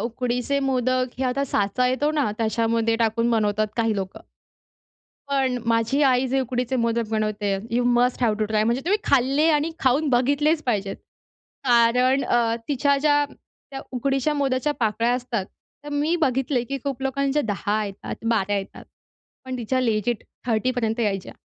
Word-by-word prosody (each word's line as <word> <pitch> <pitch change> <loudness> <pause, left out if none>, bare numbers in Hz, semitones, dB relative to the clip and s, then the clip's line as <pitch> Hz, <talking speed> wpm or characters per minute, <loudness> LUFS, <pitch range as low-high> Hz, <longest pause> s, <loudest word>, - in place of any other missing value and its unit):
उकडीचे 245 +3 -1
मोदक 255 -1 0
हे 265 - -1
आता 260 +2 0
साचा 210 0 0
येतो 260 +4 +1
ना 290 -8 +1
त्याच्यामध्ये 230 0 +1
टाकून 230 +1 +1
बनवतात 215 -2 +1
काही 225 -2 +1
लोकं. 190 -1 -5 1.1
पण 265 -2 +1
माझी 230 +4 +1
आई 260 -1 +3
जे 270 +2 +1
उकडीचे 250 0 -2
मोदक 230 -1 0
बनवते 215 -2 -1
you 240 +1 +1
must 245 +1 +2
have 225 -3 +3
to 215 - +1
try. 215 0 +1
म्हणजे 235 +3 +1
तुम्ही 400 +5 +2
खाल्ले 275 +3 +3
आणि 300 +1 +1
खाऊन 270 +4 +2
बघितलेच 285 +5 +2
पाहिजेत. 200 -5 -1 0.7
कारण 250 +2 +4
अ, 235 -1 +2
तिच्या 280 0 +2
ज्या 290 0 +3 0.5
त्या 270 -1 -6
उकडीच्या 270 +3 0
मोदकाच्या 275 0 0
पाकळ्या 230 +2 +1
असतात 245 -5 -2 0.4
तर - - -7
मी 295 +3 0
बघितले, 265 -4 0
की 275 +3 -4
खूप 275 -2 -3
लोकांच्या 275 +2 0
10 210 0 -1
येतात, 200 -1 -6
12 205 -3 +1
येतात 195 - -6 0.6
पण 260 -1 -4
तिच्या 250 +2 -1
लेजिट 225 -1 0 0.2
30 230 +1 +1
पर्यंत 230 -2 -1
यायच्या 195 -4 -2
245 Hz, 155 wpm, -23 LUFS, 225-270 Hz, 1.1 s, कारण